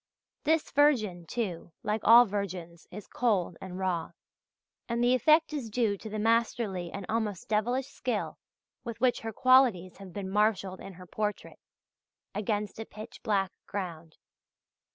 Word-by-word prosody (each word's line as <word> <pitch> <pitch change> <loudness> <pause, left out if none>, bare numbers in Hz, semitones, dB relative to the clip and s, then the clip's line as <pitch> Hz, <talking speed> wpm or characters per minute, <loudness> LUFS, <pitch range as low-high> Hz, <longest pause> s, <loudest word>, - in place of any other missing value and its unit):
This 315 +1 +2
virgin, 215 - +2
too, 180 -8 -4
like 210 0 -1
all 235 +2 +9
virgins, 185 -5 -5
is 210 +2 -9
cold 200 -8 0
and 185 -1 -7
raw 185 -3 -2 0.8
and 235 +1 0
the 245 +1 +4
effect 310 +5 +4
is 270 -7 -4
due 220 -2 +1
to 220 - -8
the 215 - -4
masterly 220 -4 0
and 200 -1 -6
almost 215 -4 -2
devilish 240 +5 0
skill - - -3 0.4
with 235 -2 -6
which 250 0 +2
her 225 - -5
qualities 240 -7 +4
have 195 -1 -11
been 190 +1 -5
marshalled 200 -2 +1
in 195 - -9
her 180 +1 -12
portrait, 210 +3 -4 0.7
against 210 +1 -2
a 225 - -4
pitch 215 +3 -10
black 195 -4 0 0.2
ground. 170 -5 -6
210 Hz, 150 wpm, -29 LUFS, 190-235 Hz, 0.8 s, all